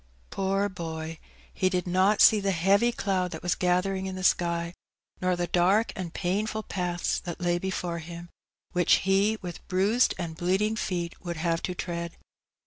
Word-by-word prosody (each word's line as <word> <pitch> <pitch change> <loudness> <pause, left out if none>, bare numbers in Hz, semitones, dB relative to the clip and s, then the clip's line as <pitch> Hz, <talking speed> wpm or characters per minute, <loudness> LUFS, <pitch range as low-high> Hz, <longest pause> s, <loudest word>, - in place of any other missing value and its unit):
Poor 195 +1 0
boy! 160 -3 -6 0.3
he 185 - +1
did 180 -2 -1
not 185 +3 +3
see 215 - +8
the 200 -1 -1
heavy 195 +6 +3
cloud 190 -5 -1
that 160 -2 -8
was 175 - +2
gathering 190 +1 0
in 190 - -4
the 185 - -5
sky, 170 -1 +1 0.5
nor 185 0 +2
the 175 0 -1
dark 185 +6 +2
and 180 -3 -5
painful 210 +4 -1
paths 175 -3 -1
that 175 -1 -7
lay 175 -1 +1
before 180 -2 -3
him, 170 +1 -8 0.4
which 180 -2 +3
he, 200 +3 +3
with 175 -2 -7
bruised 200 +6 +2
and 170 -3 -4
bleeding 195 +5 +1
feet, 175 -6 -3
would 170 -2 -4
have 165 0 0
to 180 - -3
tread. 170 -1 -4
180 Hz, 170 wpm, -27 LUFS, 175-195 Hz, 0.5 s, see